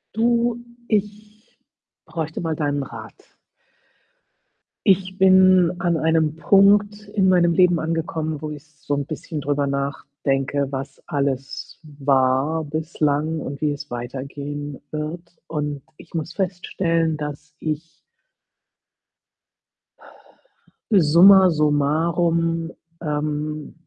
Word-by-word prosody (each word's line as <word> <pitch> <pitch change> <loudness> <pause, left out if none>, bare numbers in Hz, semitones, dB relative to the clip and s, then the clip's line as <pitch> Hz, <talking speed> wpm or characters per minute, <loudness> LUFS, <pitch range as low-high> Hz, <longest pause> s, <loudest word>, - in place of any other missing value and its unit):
Du, 235 +1 +1 0.2
ich 210 +1 -4 0.5
bräuchte 160 -2 -4
mal 165 -2 -2
deinen 145 -2 -1
Rat. - - -12 1.5
Ich 190 -1 +2
bin 185 -2 +6
an 170 -2 +1
einem 160 -1 +1
Punkt 205 +4 +4
in 195 -2 +3
meinem 175 -2 +4
Leben 175 -1 +4
angekommen, 160 -1 -2
wo 155 - -4
ich 150 -1 -9
so 145 -2 -7
'n 145 0 0
bisschen 155 -1 -5
drüber 145 0 0
nachdenke, 140 0 -2
was 135 0 -6
alles 140 -2 -3 0.2
war 135 +3 +2
bislang 155 0 -1
und 140 0 -6
wie 150 - +1
es 145 +1 -7
weitergehen 140 +4 -6
wird. 160 +3 -6
Und 150 -3 -3 0.2
ich - - -16
muss 165 0 -4
feststellen, 170 -4 -1
dass 150 0 -7
ich 155 +1 -4 3.0
summa 190 +1 +7
summarum, 165 +2 +1 0.3
ähm, 150 0 -3
155 Hz, 100 wpm, -22 LUFS, 145-175 Hz, 3.0 s, summa